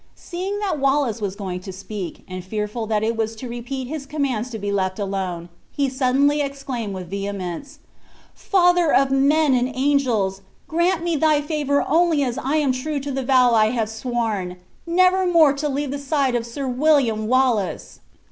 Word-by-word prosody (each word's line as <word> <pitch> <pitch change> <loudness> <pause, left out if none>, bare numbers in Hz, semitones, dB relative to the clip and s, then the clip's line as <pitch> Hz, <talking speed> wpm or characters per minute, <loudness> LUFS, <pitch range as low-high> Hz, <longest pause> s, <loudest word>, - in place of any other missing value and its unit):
Seeing 375 +3 -4
that 400 -7 -2
Wallace 270 -5 +1
was 200 -2 -2
going 190 -3 -4
to 190 +1 -8
speak, 195 -1 -7
and 185 0 -6
fearful 210 +3 -3
that 215 -1 0
it 225 +1 0
was 225 0 -2
to 250 +3 -7
repeat 245 +2 -5
his 290 0 -6
commands 265 -6 -2
to 230 - -5
be 205 -1 -3
left 190 -2 -1
alone, 190 -4 -3 0.2
he 280 -1 0
suddenly 275 +3 +2
exclaimed 270 -7 -4
with 185 -2 -6
vehemence: 200 - -5 0.6
"Father 355 -4 +3
of 270 0 +3
men 280 +2 +3
and 250 +1 +1
angels! 250 -9 +1 0.3
grant 340 +1 +1
me 340 -1 0
thy 305 0 +3
favor 290 -2 0
only 325 -2 +3
as 255 0 -2
I 275 +4 -1
am 295 -4 +2
true 280 +4 -2
to 280 +1 -5
the 270 0 -2
vow 250 -2 +4
I 215 -1 +5
have 225 -2 -1
sworn, 220 -6 -3 0.3
never 370 +2 +3
more 325 -5 +5
to 295 +1 -2
leave 280 0 -2
the 285 - -3
side 280 -2 0
of 235 -1 -1
Sir 270 +3 -5
William 250 -5 +2
Wallace!" 245 -6 0
260 Hz, 180 wpm, -22 LUFS, 215-290 Hz, 0.6 s, I